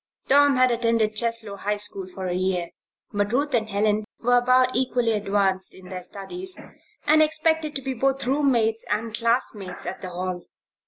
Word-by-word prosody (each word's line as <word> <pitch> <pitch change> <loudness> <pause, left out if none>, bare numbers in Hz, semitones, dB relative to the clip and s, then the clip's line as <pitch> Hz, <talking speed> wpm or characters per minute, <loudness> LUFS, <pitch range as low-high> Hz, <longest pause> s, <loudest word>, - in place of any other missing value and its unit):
Tom 285 0 +5
had 255 0 +4
attended 230 -2 +1
Cheslow 230 -2 0
High 205 +2 -2
School 200 -2 +1
for 185 0 -7
a 180 - -2
year; 180 -1 -1 0.4
but 205 0 0
Ruth 285 +3 0
and 220 -2 +1
Helen 210 +1 +1 0.2
were 245 +1 +3
about 255 +1 +3
equally 245 -2 +1
advanced 200 -2 0
in 185 -1 -13
their 185 -1 -6
studies 355 - 0 0.5
and 310 +1 +5
expected 310 0 +1
to 275 - -3
be 265 0 -2
both 270 +2 0
roommates 245 -5 +1
and 220 +2 -2
classmates 230 -5 -1
at - - -6
the 185 - -6
Hall. 180 0 -5
230 Hz, 170 wpm, -24 LUFS, 200-255 Hz, 0.5 s, Tom